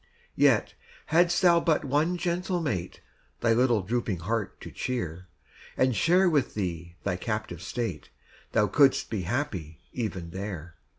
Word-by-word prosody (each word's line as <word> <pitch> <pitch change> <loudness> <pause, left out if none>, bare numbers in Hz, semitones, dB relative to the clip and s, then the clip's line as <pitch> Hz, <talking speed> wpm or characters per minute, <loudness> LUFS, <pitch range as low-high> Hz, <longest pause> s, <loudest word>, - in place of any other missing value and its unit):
Yet, - - +3 0.4
hadst 175 +2 +4
thou 170 -2 +6
but 165 -3 +1
one 150 +6 +1
gentle 180 +1 -1
mate 110 - -3 0.4
Thy 115 -1 +4
little 120 -3 +3
drooping 110 -4 -2
heart 110 +3 -2
to - - -8
cheer, 90 -8 -4 0.5
And 130 -2 +3
share 180 - +4
with 150 -6 +1
thee 85 -4 -4
thy 90 - -1
captive 110 -4 -4
state, 120 -2 -4 0.4
Thou 105 -2 +4
couldst 140 +4 +3
be 110 -4 -1
happy 90 - -3
even 95 -8 -4
there. 90 -3 -6
115 Hz, 140 wpm, -28 LUFS, 90-150 Hz, 0.5 s, thou